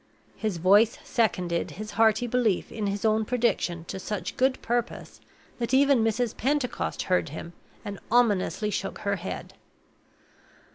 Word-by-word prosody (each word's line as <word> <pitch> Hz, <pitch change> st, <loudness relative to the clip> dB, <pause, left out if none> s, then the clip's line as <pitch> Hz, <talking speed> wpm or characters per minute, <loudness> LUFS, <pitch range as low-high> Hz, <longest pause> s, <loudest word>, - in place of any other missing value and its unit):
His 215 Hz, -5 st, -2 dB
voice 205 Hz, +6 st, +4 dB
seconded 180 Hz, -7 st, 0 dB
his 215 Hz, +1 st, -6 dB
hearty 220 Hz, +2 st, +3 dB
belief 240 Hz, -5 st, 0 dB
in 215 Hz, -2 st, -3 dB
his 200 Hz, +2 st, -2 dB
own 220 Hz, 0 st, +3 dB
prediction 215 Hz, -8 st, 0 dB
to 190 Hz, -, -6 dB
such 190 Hz, -2 st, -4 dB
good 260 Hz, 0 st, +2 dB
purpose 240 Hz, 0 st, -3 dB, 0.4 s
that 240 Hz, +2 st, 0 dB
even 275 Hz, -3 st, +4 dB
Mrs. 225 Hz, +1 st, 0 dB
Pentecost 275 Hz, 0 st, -1 dB
heard 180 Hz, -3 st, +1 dB
him, 170 Hz, +3 st, -8 dB, 0.3 s
and 200 Hz, -1 st, -6 dB
ominously 215 Hz, -2 st, +2 dB
shook 195 Hz, 0 st, -3 dB
her 200 Hz, -1 st, 0 dB
head. 185 Hz, +2 st, -6 dB
215 Hz, 140 wpm, -27 LUFS, 190-240 Hz, 0.4 s, voice